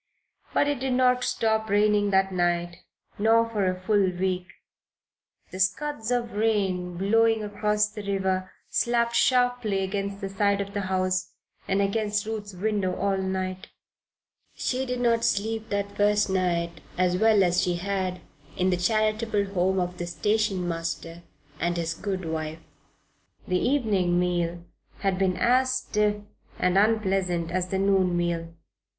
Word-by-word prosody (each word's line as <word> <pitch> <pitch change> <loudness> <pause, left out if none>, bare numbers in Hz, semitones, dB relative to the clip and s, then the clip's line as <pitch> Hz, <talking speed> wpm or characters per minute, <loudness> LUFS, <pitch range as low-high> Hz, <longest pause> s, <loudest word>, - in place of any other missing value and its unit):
But 285 - +2
it 290 -2 -1
did 260 0 -1
not 250 0 +3
stop 220 -2 0
raining 205 0 +3
that 190 0 +2
night, 175 -1 0 0.4
nor 225 +2 +4
for 210 -4 -1
a 185 0 -3
full 200 0 +2
week. 180 0 -2 1.0
The 185 - -7
scuds 220 +5 -1
of 240 -1 0
rain, 195 -5 0
blowing 225 +3 +3
across 210 0 +1
the 210 0 -8
river, 190 -2 -1 0.2
slapped 235 0 +1
sharply 245 -6 +2
against 195 +1 -3
the 195 - -4
side 200 +1 +1
of 200 0 -4
the 205 - -1
house, 185 -1 0 0.3
and 195 +1 +2
against 205 0 0
Ruth's 210 -3 -5
window 200 -1 -1
all 200 0 0
night. 185 0 -3 0.9
She 260 +1 -2
did 250 0 -2
not 230 -1 +2
sleep 220 +2 -1
that 200 0 -2
first 205 -1 +2
night 170 -2 -1 0.2
as 180 0 +2
well 215 -1 +4
as 180 0 +2
she 175 -1 0
had 185 0 -2 0.4
in 185 +1 +2
the 180 - +1
charitable 215 +1 0
home 190 +1 +1
of 180 0 -3
the 175 - -3
station 195 +1 0
master 165 0 -4 0.4
and 175 0 0
his 165 -1 -1
good 190 0 -4
wife. 160 0 -4 0.8
The 180 0 +1
evening 205 -10 +1
meal 175 -1 -1 0.4
had 195 -2 0
been 185 -2 +1
as 255 +2 +3
stiff 210 -5 0 0.4
and 180 0 +1
unpleasant 195 -5 +1
as 185 0 -1
the 190 - -1
noon 190 -2 +2
meal. 170 -1 -1
195 Hz, 150 wpm, -26 LUFS, 180-215 Hz, 1.0 s, nor